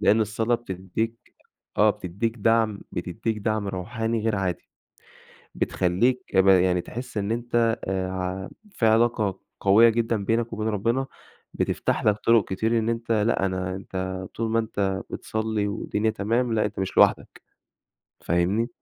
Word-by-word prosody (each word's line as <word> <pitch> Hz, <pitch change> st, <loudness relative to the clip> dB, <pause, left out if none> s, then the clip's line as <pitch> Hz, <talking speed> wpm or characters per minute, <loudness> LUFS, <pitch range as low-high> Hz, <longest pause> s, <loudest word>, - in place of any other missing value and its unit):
لأن 110 Hz, +2 st, +4 dB
الصلاة 110 Hz, +2 st, +1 dB
بتديك 110 Hz, +2 st, -4 dB, 0.4 s
آه -, -, +6 dB
بتديك 100 Hz, +6 st, -3 dB
دعم، 110 Hz, -1 st, +2 dB
بتديك 105 Hz, +5 st, -3 dB
دعم 110 Hz, -1 st, -1 dB
روحاني 110 Hz, +4 st, -2 dB
غير 110 Hz, -1 st, 0 dB
عادي، 95 Hz, -2 st, -3 dB, 0.9 s
بتخلّيك 95 Hz, +7 st, 0 dB
ب 95 Hz, +1 st, +5 dB
يعني 90 Hz, -1 st, +5 dB
تحس 120 Hz, +4 st, -7 dB
إن 100 Hz, +1 st, -1 dB
أنت 120 Hz, 0 st, +1 dB
آآ، 95 Hz, -1 st, -1 dB
ع 95 Hz, +1 st, -4 dB, 0.2 s
في 115 Hz, -, -1 dB
علاقة 110 Hz, -3 st, +2 dB, 0.2 s
قوية 105 Hz, +4 st, +6 dB
جدًا 115 Hz, -2 st, 0 dB
بينك 115 Hz, +1 st, 0 dB
وبين 110 Hz, 0 st, -2 dB
ربنا، 115 Hz, +5 st, 0 dB, 0.5 s
بتفتح -, -, -1 dB
لك 105 Hz, -1 st, +4 dB
طرق 115 Hz, -3 st, +5 dB
كتير 110 Hz, +4 st, +1 dB
إن 110 Hz, +1 st, -1 dB
أنت 115 Hz, 0 st, -2 dB
لأ 105 Hz, -2 st, +2 dB
أنا 95 Hz, -1 st, -2 dB
انت 95 Hz, -1 st, -5 dB
طول 115 Hz, 0 st, -1 dB
ما 115 Hz, -, +3 dB
أنت 100 Hz, -4 st, -1 dB
بتصلي، 110 Hz, -1 st, -2 dB
والدنيا 105 Hz, +1 st, -1 dB
تمام 115 Hz, +4 st, 0 dB
لأ 110 Hz, -, +2 dB
أنت 105 Hz, -1 st, -4 dB
مش 95 Hz, -, -3 dB
لوحدك، -, -, +3 dB, 0.8 s
فاهمني؟ 90 Hz, +7 st, +1 dB
110 Hz, 145 wpm, -25 LUFS, 95-115 Hz, 0.9 s, آه